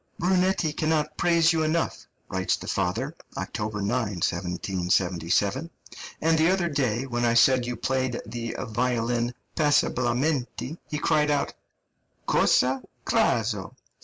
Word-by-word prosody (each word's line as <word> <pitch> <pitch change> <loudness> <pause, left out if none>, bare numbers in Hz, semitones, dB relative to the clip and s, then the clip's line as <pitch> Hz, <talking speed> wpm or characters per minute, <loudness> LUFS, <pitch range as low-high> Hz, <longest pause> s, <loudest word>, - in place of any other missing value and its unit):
"Brunetti 180 -3 +1
cannot 155 -1 0
praise 170 -1 +3
you 160 - +1
enough," 160 +1 -1 0.2
writes - - 0
the - - -9
father 110 - -1 0.2
(October 105 -2 -3
9, - - -1 0.4
1777); 90 - 0 0.5
"and 160 +1 +2
the 160 +2 +4
other 185 -2 +2
day, 130 -4 0
when 120 -2 -2
I 115 -1 +3
said 125 +1 +5
you 125 - -2
played 130 0 -1
the 115 +1 -5
violin 120 0 -1 0.2
'passabilmente,' 140 0 0
he 150 - -2
cried 150 -1 +2
out, 145 -1 0 0.7
'Cosa? 130 +1 +3 0.2
cazzo! - - +1
130 Hz, 120 wpm, -26 LUFS, 115-155 Hz, 0.7 s, said